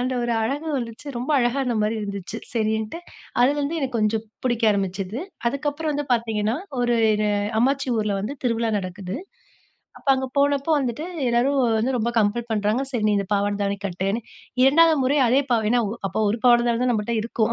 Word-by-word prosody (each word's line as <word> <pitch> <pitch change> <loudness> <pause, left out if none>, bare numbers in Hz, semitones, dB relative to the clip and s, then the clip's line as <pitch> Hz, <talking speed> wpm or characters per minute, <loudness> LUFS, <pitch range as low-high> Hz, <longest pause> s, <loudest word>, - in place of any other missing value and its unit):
அந்த 255 +1 -1
ஒரு 240 0 0
அழகு 280 +7 -2
வந்துச்சு. 230 +4 -7
ரொம்ப 245 +5 -3
அழகா 240 +2 +1
இருந்தமாரி 225 -4 0
இருந்துச்சு. 200 0 -5 0.2
சரின்ட்டு, 220 +4 -1 0.4
அதுலருந்து 285 +5 +2
எனக்கு 260 -4 -2
கொஞ்சம் 215 +1 +1 0.2
பிடிக்க 240 -2 +1
ஆரம்பிச்சது. 195 +2 -2 0.3
அதுக்கப்புறம் 290 +4 -2
வந்து 290 0 -2
பார்த்தீங்கன்னா, 225 -2 -1 0.3
ஒரு 240 0 +2 0.2
இது 210 0 0 0.3
அம்மாச்சி 270 +1 +1
ஊர்ல 210 -2 0
வந்து 215 +7 -3
திருவிழா 230 -2 +1
நடக்குது. 185 +1 -5 0.8
அப்ப - - -9
அங்கே 265 0 -2
போனப்போ 285 +2 +2
வந்துட்டு 260 +2 -2 0.2
எல்லாரும் 250 +4 +2 0.2
வந்து 250 +4 0
ரொம்ப 235 +1 0
கம்பள் 225 +3 +1
பண்றாங்க. 215 +3 +1
சரி. 240 -5 -2
நீ - - +3
இந்த 200 - -2
பாவாட 205 0 +1
தாவணி 200 0 -1
கட்டுன்னு, 195 +4 -2 0.4
2வது 320 +4 +6
முறை 275 +3 +2
அதே 260 +4 +4
பா 240 - +5
ஏன்னா 245 - +3 0.3
அப்போ - - -4
1 225 - -1
பாவாட 240 -1 +6
தான் 245 +1 +1
நம்மட்ட 220 +1 -1
இருக்கும். 230 0 0
235 Hz, 170 wpm, -23 LUFS, 210-265 Hz, 0.8 s, 2வது